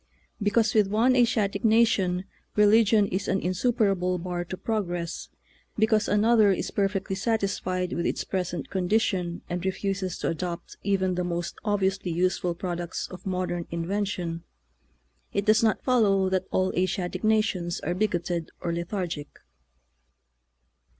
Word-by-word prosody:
Because 215 +2 +2
with 210 -3 +4
one 225 +6 +3
Asiatic 220 -5 +2
nation 210 -5 +3 0.3
religion 210 0 +5
is 190 +2 -2
an 195 - +1
insuperable 185 -2 +1
bar 175 0 -3
to 185 +1 -6
progress, 175 -7 -3 0.5
because 220 -1 +3
another 215 0 +4
is 190 - -2
perfectly 195 -1 -1
satisfied 195 -4 -1
with 170 - -1
its - - -1
present 180 -5 -3
condition 185 -2 0
and 175 0 -3
refuses 190 -1 -2
to - - -1
adopt 170 +1 -4
even 190 -2 +1
the 180 0 -1
most 175 -1 -3
obviously 195 -3 0
useful 175 0 0
products 175 -1 -4
of 185 +1 -9
modern 180 -2 -2
invention, 170 -1 -2 0.9
it 200 - 0
does 215 +1 +5
not 225 -1 +1
follow 200 -7 +3
that 185 0 -1
all 185 0 +1
Asiatic 185 0 -1
nations 215 -6 +1
are 175 - -1
bigoted 175 -4 -1
or 170 - -2
lethargic. 170 -3 -3
190 Hz, 130 wpm, -26 LUFS, 175-210 Hz, 0.9 s, religion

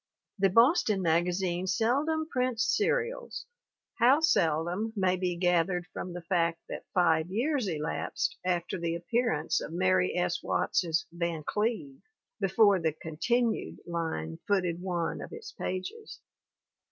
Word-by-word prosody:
The 195 0 +4
Boston 230 - +4
magazine 175 +2 +1
seldom 280 - +1
prints 250 -6 0
serials, 475 +2 -1 0.5
how 255 +5 +6
seldom 180 - +1
may 185 -2 +2
be 180 -1 -1
gathered 175 0 +1
from 180 - -5
the 175 -1 -7
fact 170 -1 +1
that - - -7
five 165 -2 +2
years 250 +4 0
elapsed 160 - -2
after 180 0 -1
the 170 0 -1
appear 230 +8 0
ance 155 +1 0
of - - -6
Mary 95 - +2
S. - - 0
Watts's 160 -2 0
Van 170 -2 -3
Cleve 240 - -2 0.4
before 200 0 +4
the 160 -2 0
"con 160 0 -9
tinued" 235 +5 0
line 160 - -3
footed 180 -4 +1
one 175 -3 -2
of - - -8
its 450 0 -8
pages. 185 - -5
185 Hz, 135 wpm, -29 LUFS, 170-235 Hz, 0.5 s, how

